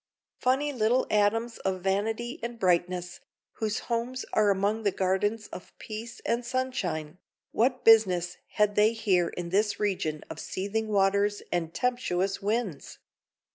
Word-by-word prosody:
Funny 275 +3 +1
little 240 +1 +2
atoms 225 +3 +1
of 190 -1 -2
vanity 225 - -1
and 235 0 -5
brightness, 180 -2 0 0.4
whose 215 -1 -1
homes 240 +2 -3
are 210 -1 +4
among 200 +3 +1
the 205 - +2
gardens 200 +4 0
of 180 - -11
peace 225 +2 -7
and 235 +1 0
sunshine, 190 -11 -3 0.3
what 250 +3 +1
business 185 -6 +5 0.2
had 210 -1 +2
they 210 +2 +4
here 190 -6 +2
in 175 0 -5
this 205 +2 +1
region 180 -7 -1
of 160 - -8
seething 205 +6 -3
waters 200 0 +2
and 165 -2 -2
tempestuous 200 -7 0
winds? 205 - -2
210 Hz, 135 wpm, -28 LUFS, 185-230 Hz, 0.4 s, business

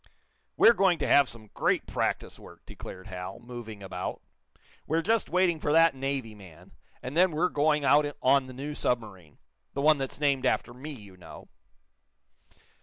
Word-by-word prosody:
"We're 230 - +7
going 190 -5 +3
to - - -2
have 140 -2 +5
some 110 -3 -9
great - - 0
practice - - -3
work," - - -15
declared 95 0 -10
Hal, 90 0 -7
moving 115 -4 -9
about. 95 - -5 0.7
"We're 165 +2 0
just 225 +3 +1
waiting 180 -3 +2
for 145 - -1
that 165 +1 +5
Navy 135 -4 -3
man, 90 -3 -15 0.3
and 130 +3 -6
then 185 +2 +5
we're 170 +3 0
going 150 0 +1
out 145 +2 +4
on 135 0 +3
the 130 - -10
new 140 +4 -6
submarine 105 - -3 0.4
the 140 - -1
one 155 -1 +5
that's 135 0 -4
named 140 -3 +1
after 120 - -1
me, 130 +5 -9
you 105 -10 -10
know." 90 - -13
135 Hz, 170 wpm, -28 LUFS, 110-155 Hz, 0.7 s, We're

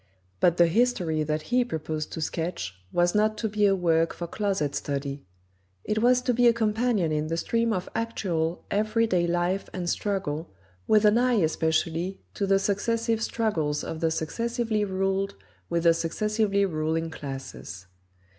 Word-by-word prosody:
But 175 -1 +3
the 175 - +7
history 180 -5 +1
that 155 0 -1
he 250 0 +5
proposed 155 -7 -4
to 160 - -4
sketch 160 - -3 0.2
was 175 0 +2
not 215 +1 +2
to 220 - -1
be 210 -1 +2
a 195 - +3
work 165 -2 +2
for 170 - -4
closet 190 -6 -1
study. 140 0 -3 0.6
It 215 +1 -1
was 250 +1 +4
to 250 - +1
be 245 +1 +4
a 235 - +6
companion 220 -5 +1
in 155 0 0
the 165 +1 -2
stream 230 +6 0
of 185 -4 -2
actual, 180 -8 -2
every 215 +2 +2
day 180 -5 +1
life 175 +3 0
and 180 -2 -3
struggle, 175 -5 -2 0.4
with 215 0 +4
an 210 +3 +5
eye 250 0 +3
especially 160 +3 0
to 200 - -1
the 195 0 +4
successive 225 +3 0
struggles 165 -11 -1
of 160 - -5
the 165 -1 +2
successively 230 - -1
ruled 195 0 -1 0.3
with 170 -1 0
the 170 -1 +6
successively 200 +4 0
ruling 160 -1 -1
classes. 135 - -7
185 Hz, 165 wpm, -26 LUFS, 160-215 Hz, 0.6 s, the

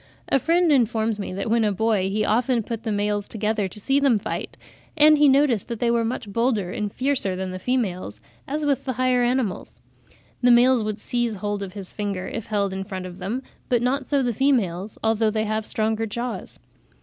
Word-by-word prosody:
A 275 - +3
friend 335 +4 +3
informs 225 -4 +2
me 200 - -4
that 195 +3 -3
when 230 0 +3
a 210 - +2
boy 205 -1 +1
he 210 +2 0
often 240 +1 +1
put 230 +1 -5
the 225 -1 -3
males 205 0 -1
together 215 -2 -1
to 210 - -9
see 270 +7 +2
them 275 -5 +3
fight, 205 - -5 0.4
and 305 0 +6
he 295 -1 +6
noticed 265 -6 +3
that 235 -2 -5
they 235 -1 +2
were 235 -1 +2
much 225 -1 -3
bolder 230 -6 +1
and 210 +1 -3
fiercer 255 -8 0
than 185 0 -4
the 185 - -6
females, 185 - -2 0.3
as 295 +2 -2
with 280 -3 0
the 260 - -1
higher 255 0 +2
animals. 240 -5 -1 0.6
The 245 - +4
males 245 +1 +5
would 215 -1 -3
seize 240 +1 0
hold 205 +1 -3
of 190 -2 -6
his 195 -3 -8
finger, 200 -3 -3
if 225 - -5
held 200 -3 0
in 190 0 -3
front 190 -2 -6
of 180 0 -9
them, 220 +8 -3 0.3
but 240 -1 +2
not 260 +2 -1
so 280 -2 +2
the 245 -1 0
females, 210 -7 0
although 220 0 +2
they 215 0 -1
have 215 0 -2
stronger 220 +1 0
jaws. 235 +3 -5
225 Hz, 210 wpm, -23 LUFS, 205-250 Hz, 0.6 s, and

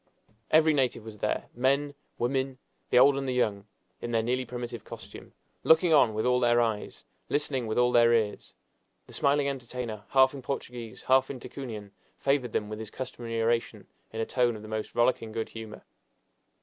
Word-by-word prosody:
Every 155 0 +5
native 130 -5 0
was 110 -2 -10
there 105 - -1
men, 140 +4 +1 0.2
women, 130 +1 -1 0.3
the - - +3
old 135 +2 +7
and 135 -1 -2
the 130 - -1
young, 105 -5 0 0.3
in 120 - -4
their 115 -1 +1
nearly 125 +2 0
primitive 120 -1 -6
costume, - - -11 0.3
looking 160 +1 +5
on 125 -7 +5
with 110 - -1
all 125 0 +3
their 120 -1 +4
eyes, 110 -3 -2 0.2
listening 135 -5 -1
with 110 - -2
all 125 0 +4
their 120 -1 +5
ears. 110 -3 0 0.5
The - - -14
smiling 140 0 +2
entertainer, 125 -5 -5
half 130 0 +4
in 140 - -7
Portuguese, 120 -4 -6
half 130 0 +3
in 130 - -6
Ticunian, 110 -7 -7 0.3
favored 135 -4 0
them 105 - -1
with 105 0 -6
his 110 -2 -6
customary 115 -2 -5
oration 115 +1 0 0.3
in 110 - -6
a 115 - 0
tone 120 -1 +1
of 105 - -9
the - - -9
most 110 0 -4
rollicking 120 -2 +2
good 115 0 -3
humor. 110 -1 -9
120 Hz, 185 wpm, -28 LUFS, 110-135 Hz, 0.5 s, old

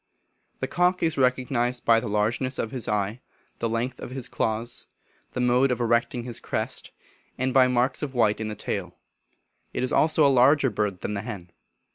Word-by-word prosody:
The 130 - 0
cock 180 +5 +1
is 160 -1 +1
recognised 125 -1 0
by 115 -1 +5
the 115 - -5
largeness 115 +5 0
of 110 - -2
his 125 -4 -4
eye, 105 +3 -1 0.4
the 115 - -1
length 120 +3 -2
of - - -7
his 130 -1 -5
claws, 115 +2 -2 0.5
the - - -3
mode 125 +2 +3
of 125 -2 -1
erecting 120 +1 +1
his 120 -1 -4
crest, - - -3 0.5
and 130 0 -1
by 130 -1 +6
marks 125 +1 +1
of 140 -3 -4
white 110 -3 +3
in 110 - -2
the 105 - -4
tail. 90 -3 -4 0.8
It - - -2
is 130 - -1
also 155 -1 +4
a 135 -2 +4
larger 140 0 +5
bird 105 -3 -2
than - - -3
the 100 - -2
hen. 100 -6 -7
120 Hz, 190 wpm, -25 LUFS, 110-130 Hz, 0.8 s, by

